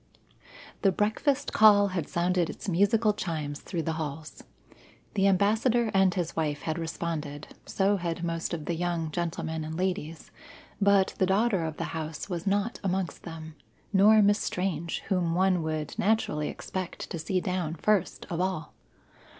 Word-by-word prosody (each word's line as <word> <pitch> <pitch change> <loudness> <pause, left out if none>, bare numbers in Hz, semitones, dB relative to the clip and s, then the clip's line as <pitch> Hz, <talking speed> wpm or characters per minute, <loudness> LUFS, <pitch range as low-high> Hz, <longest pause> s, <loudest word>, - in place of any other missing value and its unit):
The 195 - +4
breakfast 265 - 0
call 205 -2 +6
had 175 -5 -3
sounded 175 0 +1
its - - -7
musical 205 +4 +3
chimes 155 -7 -4
through 170 -4 -4
the 160 - -1
halls. 155 +1 -6 0.7
The 195 -1 +3
Ambassador 220 +4 +2
and 190 -1 +4
his 175 -2 -3
wife 150 -3 -1
had 160 +1 -2
responded, 160 -3 -4 0.2
so 200 +1 +2
had 170 -1 -3
most 165 -1 -2
of 160 -3 -4
the 170 - -1
young 170 -2 -2
gentlemen 160 -1 -3
and 160 +1 -5
ladies, 175 -4 -3 0.5
but 200 -1 +4
the 185 - +3
daughter 195 -1 +2
of 160 -1 -4
the - - -2
house 160 +2 -5
was 175 +1 -3
not 205 +3 0
amongst 190 -2 -2
them, 160 -2 -8 0.4
nor 210 +2 +6
Miss 205 +1 +4
Strange, 170 -3 -2
whom 175 -4 +1
one 185 -1 +3
would 155 -1 -3
naturally 185 -8 +1
expect 185 -2 -5
to 170 - -3
see 185 +4 0
down 180 -3 -2
first 200 +2 0
of 170 +1 -1
all. 185 -4 -2
175 Hz, 160 wpm, -28 LUFS, 160-195 Hz, 0.7 s, call